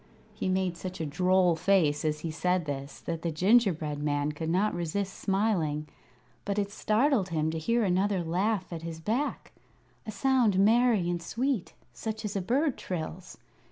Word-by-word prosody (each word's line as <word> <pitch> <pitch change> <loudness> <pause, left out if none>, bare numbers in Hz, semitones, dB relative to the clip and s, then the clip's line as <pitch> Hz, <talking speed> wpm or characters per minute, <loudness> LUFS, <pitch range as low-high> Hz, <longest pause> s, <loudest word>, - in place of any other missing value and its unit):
He - - -3
made 185 -2 0
such 185 -1 -6
a 160 - -2
droll 180 +3 +3
face 160 -4 +2
as 150 -1 -1
he 165 - -3
said 180 +1 0
this 140 -1 -5
that 165 -1 -4
the 170 - -1
gingerbread 165 -4 +2
man 145 0 0
could 160 +2 -4
not 190 +5 +2
resist 180 +3 -2
smiling, 180 -7 0 0.6
but 200 0 -2
it 200 -1 -1
startled 215 0 +1
him 160 -1 0
to 160 - -3
hear 230 +8 +1
another 190 0 +1
laugh 185 +3 -1
at 165 - -5
his 165 -1 -6
back 230 - -2 0.6
a - - -3
sound 240 -3 +2
merry 220 -1 +4
and 175 -1 -1
sweet, 230 0 -2 0.2
such 220 0 -5
as 205 - -4
a 195 - 0
bird 265 - 0
trills. 180 0 -6
185 Hz, 170 wpm, -29 LUFS, 160-210 Hz, 0.6 s, merry